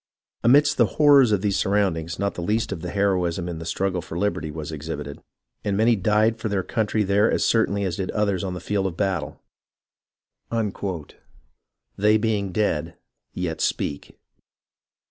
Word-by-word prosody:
Amidst 140 +4 +5
the 120 - +4
horrors 140 -5 +6
of 100 -3 +2
these 100 -2 +1
surroundings 95 -5 0
not 100 0 -1
the - - -6
least 105 +6 -1
of 90 -4 -4
the 90 - -5
heroism 90 -3 0
in 85 -2 -5
the 80 - -7
struggle 95 +1 -1
for 80 - -7
liberty 85 -6 -1
was 75 0 -6
exhibited, 75 -2 -6 0.4
and 100 -1 -1
many 115 +2 +4
died 110 +3 +2
for 110 - -3
their 100 -2 0
country 110 +1 0
there 100 +2 +3
as - - +1
certainly 100 -3 +2
as 95 -1 -2
did 95 -2 -3
others 100 -3 0
on 95 -2 -3
the - - -5
field 95 +2 -1
of 90 -2 -6
battle. 95 -7 -2 2.6
'They 105 +2 +4
being 105 -3 -1
dead 95 -6 -1 0.4
yet 85 -3 -3
speak.' 70 - -2
100 Hz, 165 wpm, -24 LUFS, 85-105 Hz, 2.6 s, horrors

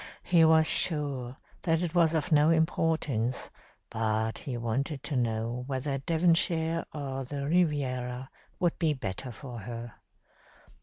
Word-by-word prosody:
He 170 -2 +4
was 160 0 +5
sure 140 -6 +2 0.2
that 165 -1 +1
it 170 - -3
was 165 -2 +3
of 155 -1 -1
no 150 0 +5
importance, 160 -7 0 0.4
but 110 0 -1
he 125 -4 -5
wanted 135 +5 -2
to 150 - -3
know 115 0 -1
whether 135 0 -2
Devonshire 165 +1 +1
or 135 -2 -4
the 140 +2 -5
Riviera 130 -6 0 0.3
would 175 -2 0
be 160 -4 +2
the - - -9
better 115 +4 -5
for 120 0 -9
her. 115 +2 -7
140 Hz, 140 wpm, -29 LUFS, 125-160 Hz, 0.4 s, was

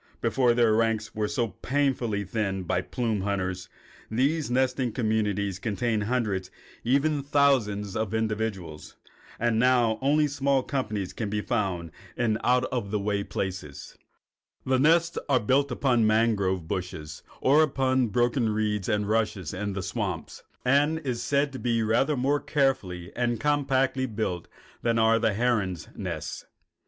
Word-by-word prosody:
Before 125 -3 +2
their 120 -2 +4
ranks 110 -1 0
were 105 -1 -1
so 115 +1 -1
painfully 130 -6 -1
thinned 95 -2 -2
by - - 0
the - - -17
plume 115 -5 -1
hunters, 95 -2 -2 0.4
these 140 +7 +1
nesting 130 0 +1
communities 105 -5 0
contained 110 0 -1
hundreds 105 -6 -1
and - - -29 0.4
even 145 +2 +2
thousands 130 -9 +1
of 110 -2 -1
individuals. 110 -8 -3 0.4
But 120 0 +1
now 115 -1 +3
only 150 +3 +3
small 140 -2 +1
companies 105 -9 -3
can 110 -3 -3
be 105 0 -1
found 95 -8 -2 0.3
in 110 -3 +1
out 125 0 +3
of 120 -6 -2
the 105 - 0
way 100 0 -1
places. 95 -8 -5 0.7
The 130 0 +2
nest 165 +4 +3
is 130 -3 +4
built 135 +6 +2
upon 125 -1 +2
the 110 - +4
mangrove 100 -6 +1
bushes 80 -4 -5 0.2
or 145 +4 +5
upon 130 -4 +2
the - - -2
broken 120 +1 +2
reeds 105 -2 -1
and 105 -1 0
rushes 105 -6 -1
in 100 +1 -3
the 95 -1 -4
swamps, 90 -4 -4 0.2
and 145 +5 +3
is 130 -7 -3
said 140 +3 +1
to 130 - -6
be 115 -2 +1
rather 125 +7 +2
more 140 +3 +1
carefully 100 - -1
and 120 -2 0
compactly 135 -1 +1
built 105 -7 -3 0.3
than 115 -1 +1
are 115 0 +4
the 110 -2 +1
herons' 105 -8 0
nests. - - -5
115 Hz, 155 wpm, -27 LUFS, 100-130 Hz, 0.7 s, or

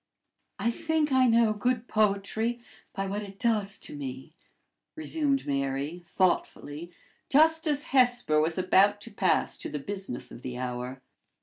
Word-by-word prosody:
"I 235 - +1
think 320 +1 0
I 260 -1 +5
know 230 -2 +4
good 245 +2 -1
poetry 215 +3 0 0.3
by 195 0 -3
what 200 +2 -3
it 200 -1 -9
does 210 -4 0
to - - -8
me," 135 +2 -7 0.6
resumed 305 -3 0
Mary, 140 +3 -2
thoughtfully, 170 -2 -1 0.4
just 320 +3 +4
as 295 -1 +1
Hesper 245 - +3
was 160 +1 +1
about 195 +3 +4
to 230 - -9
pass 195 -2 +1
to - - -6
the - - -4
business 145 -6 -6
of - - -10
the 125 -1 -6
hour. 125 +1 -5
200 Hz, 145 wpm, -28 LUFS, 150-245 Hz, 0.6 s, I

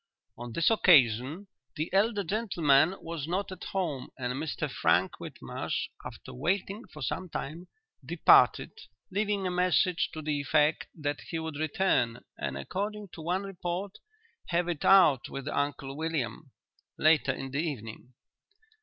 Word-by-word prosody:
"'On 120 0 -8
this 170 - +2
occasion 145 - +4 0.3
the 155 +2 -3
elder 205 +1 +2
gentleman 175 -5 +2
was 165 -3 -5
not 195 +3 -2
at 185 - -8
home 160 -9 -3
and 125 -1 -2
Mr 150 +3 -3
Frank - - +1
Whitmarsh, - - -4
after - - -9
waiting 195 - -2
for 150 - -8
some 185 +7 -3
time, 165 +4 -6 0.4
departed, - - +5 0.4
leaving 205 0 0
a 180 - 0
message 180 0 +2
to 155 - -6
the 150 -1 -1
effect 150 +2 +2
that 145 -2 -3
he 165 - -2
would 160 -2 -4
return, 140 -7 +1
and, 70 0 -4
according 205 - -4
to 165 - -10
one 180 +4 -1
report, 185 0 -5 0.5
"have 175 0 0
it 170 -4 -3
out 175 -10 +6
with 135 0 -6
Uncle 140 -2 -2
William," 155 -2 -3 0.5
later 155 -4 +4
in 135 0 -6
the 140 +3 0
evening. 125 -5 -6
160 Hz, 145 wpm, -29 LUFS, 140-185 Hz, 0.5 s, out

